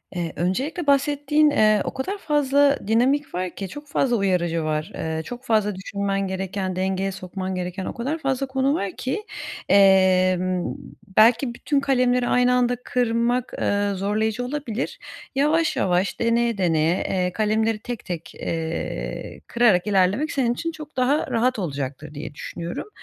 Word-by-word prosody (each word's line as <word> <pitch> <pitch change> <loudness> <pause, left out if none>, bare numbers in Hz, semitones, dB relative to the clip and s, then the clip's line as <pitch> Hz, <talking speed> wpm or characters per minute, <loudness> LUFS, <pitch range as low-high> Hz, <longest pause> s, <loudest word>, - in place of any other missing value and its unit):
Eee, 170 -2 -3
öncelikle 275 - -2
bahsettiğin, 290 +2 +3
eee, 215 -6 +4
o - - -4
kadar 325 +10 -3
fazla 285 -3 +3
dinamik 260 +5 +2
var 180 0 -1
ki 195 - -5
çok 290 +9 -10
fazla 265 -3 +1
uyarıcı 175 -5 +1
var. 155 0 -2
Eee, 160 0 -3
çok 245 +8 -8
fazla 215 -4 +1
düşünmen 195 0 -2
gereken, 190 0 -3
dengeye 190 +1 -1
sokman 185 0 -5
gereken 180 +1 -4
o - - -4
kadar 275 +7 -2
fazla 275 -3 -1
konu 265 +1 +1
var 200 -9 -2
ki, 410 +12 -3 0.5
emm, 185 -2 +4 0.4
belki 235 +3 +5
bütün 285 +3 0
kalemleri 250 -2 +2
aynı 250 0 +3
anda 245 0 +2
kırmak, 240 0 0
ııı, 205 0 +1
zorlayıcı 215 +4 -1
olabilir. 255 -4 -4 0.4
Yavaş 305 +4 +2
yavaş, 185 +1 0
deneye 235 -1 +1
deneye, 165 -2 +2
eee, 180 -1 0
kalemleri 220 0 +1
tek 240 +1 -6
tek, 170 -3 -6
eee, 160 - -4
kırarak 215 -5 +3
ilerlemek 205 +9 +2
senin 245 -4 +1
için 330 +7 -3
çok 305 -2 -11
daha 260 +4 +2
rahat 240 0 +1
olacaktır 145 -2 -4
diye 145 0 -7
düşünüyorum. 170 - -6
215 Hz, 150 wpm, -23 LUFS, 185-260 Hz, 0.5 s, belki